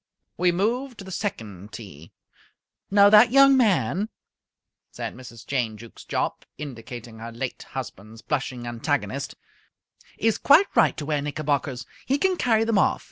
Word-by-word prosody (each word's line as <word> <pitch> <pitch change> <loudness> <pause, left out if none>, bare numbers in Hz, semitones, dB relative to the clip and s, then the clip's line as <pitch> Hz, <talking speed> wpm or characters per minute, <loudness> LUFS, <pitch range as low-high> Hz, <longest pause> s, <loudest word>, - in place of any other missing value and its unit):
We 180 +1 +2
moved 235 +8 -1
to - - -9
the 190 - -10
second 110 - -5
tee. 95 -8 -10 0.8
"Now, 200 0 +6
that 215 +3 +8
young 275 +1 +7
man," 210 -3 +2 0.8
said - - -6
Mrs. 120 -2 -12
Jane 120 -6 -1
Jukes 115 +1 -13
Jopp, - - -2
indicating 120 -4 -8
her 115 +1 -7
late 115 - -5
husband's 110 +3 -8
blushing 130 -4 -3
antagonist, 120 -1 -2 0.8
"is 225 0 +1
quite 325 +8 +5
right - - +4
to 150 - -4
wear 150 -1 0
knickerbockers. 145 -3 -2 0.2
He 275 - +2
can 375 +5 +2
carry 225 -8 +2
them 225 -2 +2
off. - - +2
150 Hz, 145 wpm, -25 LUFS, -, 0.8 s, that